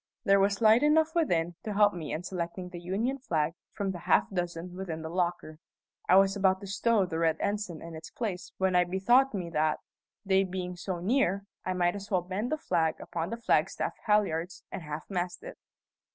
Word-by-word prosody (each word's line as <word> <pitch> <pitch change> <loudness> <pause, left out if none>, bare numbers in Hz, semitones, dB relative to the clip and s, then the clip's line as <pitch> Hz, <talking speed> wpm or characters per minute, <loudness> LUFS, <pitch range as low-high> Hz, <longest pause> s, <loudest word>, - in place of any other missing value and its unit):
There 200 -3 +5
was 200 +1 +2
light 220 +2 +7
enough 315 +2 +3
within 175 - +1
to 210 -2 -4
help 205 0 +5
me 160 -4 -5
in 160 - -3
selecting 180 0 -4
the 175 -1 -8
Union 215 +10 -2
flag 160 - 0 0.2
from 200 -1 -2
the 180 - -6
half 170 - +3
dozen 175 -1 -4
within 170 -4 -5
the 160 - -5
locker. 175 -3 -2 0.5
I 185 - +7
was 195 +1 +5
about 190 -1 +3
to - - -7
stow 200 +1 +2
the 165 -3 -3
red 160 -1 +2
ensign 205 -5 -2
in 170 0 -8
its 160 0 -9
place 200 -6 -4
when 190 -1 +1
I 180 - +6
bethought 220 +8 +3
me 175 -3 -4
that, 155 -1 +1 0.5
day 190 0 +4
being 180 -1 -4
so 180 +1 -4
near, 200 0 +1 0.2
I 185 - 0
might 175 0 +1
as 200 0 -7
well 185 -4 +1
bend 195 +7 -3
a 310 - +1
flag 160 - 0
upon 170 +1 -4
the 230 - -4
flagstaff 235 - +1
halliards 185 -5 +1
and - - -5
half 150 -1 -6
mast 180 - -3
it. - - -9
185 Hz, 205 wpm, -29 LUFS, 170-205 Hz, 0.5 s, light